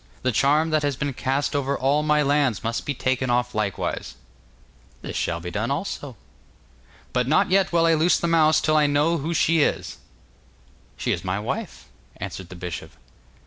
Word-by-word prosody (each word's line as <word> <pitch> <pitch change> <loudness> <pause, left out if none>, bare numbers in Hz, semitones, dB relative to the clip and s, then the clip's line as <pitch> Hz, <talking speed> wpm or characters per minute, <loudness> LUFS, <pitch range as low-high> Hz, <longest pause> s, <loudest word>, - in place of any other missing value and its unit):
The 130 - +2
charm 150 +7 +2
that 155 -1 +2
has 145 -2 0
been 140 +2 -3
cast 135 +3 -1
over 140 0 0
all 140 +3 +2
my 150 0 +2
lands 140 -6 +1
must 115 +1 -3
be 145 - -1
taken 130 0 -1
off 125 0 +1
likewise.' 105 -2 -3 0.9
'This - - -6
shall 85 0 -1
be 90 +1 -6
done - - -2
also.' - - -4 1.0
'But 125 -1 +1
not 155 +5 +3
yet 195 0 +3
will 170 -1 +3
I 165 - +4
loose 160 +3 +3
the - - -2
mouse 160 -2 +4
till 155 - +2
I 150 -1 +4
know 150 +4 +2
who 165 +4 -3
she 160 +1 +3
is.' - - -1 1.0
'She - - -1
is - - -2
my 95 +1 -2
wife,' 105 - -5 0.3
answered 95 -2 -7
the 90 - -9
bishop. 85 -1 -6
140 Hz, 185 wpm, -24 LUFS, 125-155 Hz, 1.0 s, I